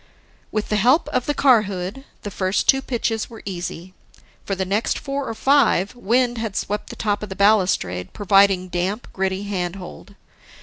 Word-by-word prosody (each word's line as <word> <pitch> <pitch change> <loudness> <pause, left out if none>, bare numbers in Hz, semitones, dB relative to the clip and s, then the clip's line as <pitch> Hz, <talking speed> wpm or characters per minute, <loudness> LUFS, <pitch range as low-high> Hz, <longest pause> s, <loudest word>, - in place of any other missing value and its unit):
With 215 -1 -2
the 210 - +1
help 255 - +3
of 250 - -1
the 290 - 0
car 255 -6 +5
hood, 195 +8 -5 0.2
the 205 - -5
first 185 +1 -1
two 270 - +5
pitches 230 -4 -2
were 225 -2 -12
easy. 180 -1 -6 0.5
For 195 - -2
the 190 0 -2
next 205 +4 0
four 275 -1 -4
or 225 - -4
five, 245 -8 +3
wind 245 +1 +1
had 220 -3 -4
swept 210 +1 -3
the - - -8
top 205 -2 -1
of 210 - -6
the 190 - -6
balustrade, 180 - +2
providing 195 -2 +3
damp, 185 +6 -2
gritty 190 0 -1
handhold. 190 0 -5
205 Hz, 175 wpm, -22 LUFS, 190-235 Hz, 0.5 s, car